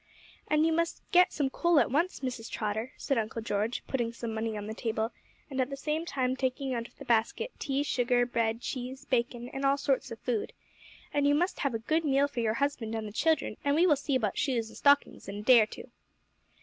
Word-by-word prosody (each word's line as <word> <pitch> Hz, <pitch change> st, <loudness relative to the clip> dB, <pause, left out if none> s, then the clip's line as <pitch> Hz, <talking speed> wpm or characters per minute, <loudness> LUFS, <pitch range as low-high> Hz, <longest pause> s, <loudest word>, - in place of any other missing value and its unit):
'And 305 Hz, +1 st, +3 dB
you 325 Hz, -, +2 dB
must 335 Hz, +1 st, -1 dB
get 360 Hz, 0 st, +6 dB
some 275 Hz, -3 st, -1 dB
coal 340 Hz, 0 st, +3 dB
at 275 Hz, -, +2 dB
once, 335 Hz, +7 st, 0 dB
Mrs. 250 Hz, -4 st, -4 dB
Trotter,' 220 Hz, +3 st, -3 dB
said 275 Hz, -5 st, 0 dB
Uncle 225 Hz, +1 st, -3 dB
George, 215 Hz, +2 st, -1 dB
putting 240 Hz, -3 st, -1 dB
some 230 Hz, -1 st, -5 dB
money 220 Hz, 0 st, -2 dB
on 205 Hz, -, -5 dB
the 215 Hz, -, -4 dB
table, 220 Hz, 0 st, -2 dB, 0.4 s
and 265 Hz, -2 st, -1 dB
at 255 Hz, -, -1 dB
the 275 Hz, -, -5 dB
same 310 Hz, +4 st, -2 dB
time 260 Hz, -4 st, 0 dB
taking 260 Hz, 0 st, -1 dB
out 230 Hz, -1 st, -3 dB
of -, -, -28 dB
the -, -, -10 dB
basket 235 Hz, -, +1 dB
tea, 275 Hz, +1 st, 0 dB
sugar, 245 Hz, -3 st, +2 dB
bread, 230 Hz, -1 st, -1 dB
cheese, 255 Hz, +1 st, -5 dB
bacon, 240 Hz, -1 st, -1 dB
and 270 Hz, -, -5 dB
all 275 Hz, 0 st, +3 dB
sorts 275 Hz, -1 st, 0 dB
of 230 Hz, -, -7 dB
food. 230 Hz, -2 st, -2 dB, 0.6 s
'And 285 Hz, -1 st, +2 dB
you 290 Hz, -, +4 dB
must 355 Hz, +5 st, 0 dB
have 275 Hz, -5 st, 0 dB
a 225 Hz, 0 st, -5 dB
good 320 Hz, +1 st, +2 dB
meal 280 Hz, -1 st, +3 dB
for 285 Hz, -4 st, -5 dB
your 225 Hz, -1 st, +1 dB
husband 260 Hz, -5 st, -1 dB
and 220 Hz, -1 st, -3 dB
the -, -, -7 dB
children, 320 Hz, +8 st, +1 dB
and 285 Hz, 0 st, +2 dB
we 335 Hz, +3 st, +5 dB
will 315 Hz, -5 st, +5 dB
see 280 Hz, 0 st, -2 dB
about 215 Hz, -6 st, 0 dB
shoes 235 Hz, -5 st, 0 dB
and -, -, -12 dB
stockings 285 Hz, 0 st, +3 dB
in 200 Hz, -, -5 dB
a 205 Hz, -, -5 dB
day 240 Hz, 0 st, +8 dB
or 215 Hz, -, +2 dB
two. -, -, -10 dB
255 Hz, 235 wpm, -30 LUFS, 230-285 Hz, 0.6 s, day